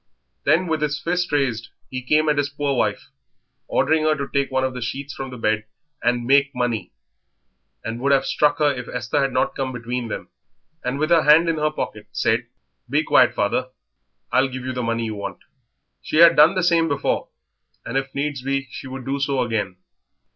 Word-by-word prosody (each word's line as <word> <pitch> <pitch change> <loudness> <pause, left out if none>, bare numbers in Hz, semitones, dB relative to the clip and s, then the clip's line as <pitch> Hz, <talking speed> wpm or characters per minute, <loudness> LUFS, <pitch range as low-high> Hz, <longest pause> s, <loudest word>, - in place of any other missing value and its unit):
Then, 160 +5 +3
with 160 -3 -1
his 150 0 -1
fist 180 0 -1
raised, 125 -6 0 0.2
he 130 0 -4
came 150 +5 +2
at 150 -1 +2
his 145 0 0
poor 145 -1 -1
wife, - - -1 0.6
ordering 160 0 +2
her 155 0 +2
to 140 -2 -4
take 140 -1 0
one 130 0 0
of 130 0 -1
the 125 - -6
sheets 135 +4 -4
from 135 0 -6
the 125 - -8
bed 110 -1 0 0.4
and 120 0 +1
"make 140 +2 +3
money," 115 -7 -2 0.9
and 115 +2 -5
would 140 +1 +2
have 140 - +3
struck 150 -1 +2
her 150 -2 +3
if 125 -2 -7
Esther 120 +2 -1
had 135 -1 +1
not 130 - 0
come 135 -1 -2
between 125 0 -4
them - - -6 0.5
and, 125 +2 -2
with 155 +3 -1
her 165 -1 +6
hand 155 +3 +6
in 165 - 0
her 155 0 +2
pocket, 155 - -5
said, - - 0 0.4
"Be - - +2
quiet, - - +4
father; 115 +5 0 0.6
I'll 130 +2 +3
give 130 -1 -7
you 130 - -3
the 125 - -3
money 115 0 -1
you 110 - -3
want." 100 -2 -6 0.6
She - - -5
had 170 0 +8
done 155 +5 +6
the 185 - +1
same 170 -1 +3
before, 145 -3 -1 0.6
and, 115 - -5
if 135 0 -2
needs 140 -1 -2
be, 135 +1 -2
she - - -8
would 130 -1 -7
do 140 +1 -2
so 140 -2 +1
again. 105 -6 -2
135 Hz, 205 wpm, -22 LUFS, 125-150 Hz, 0.9 s, had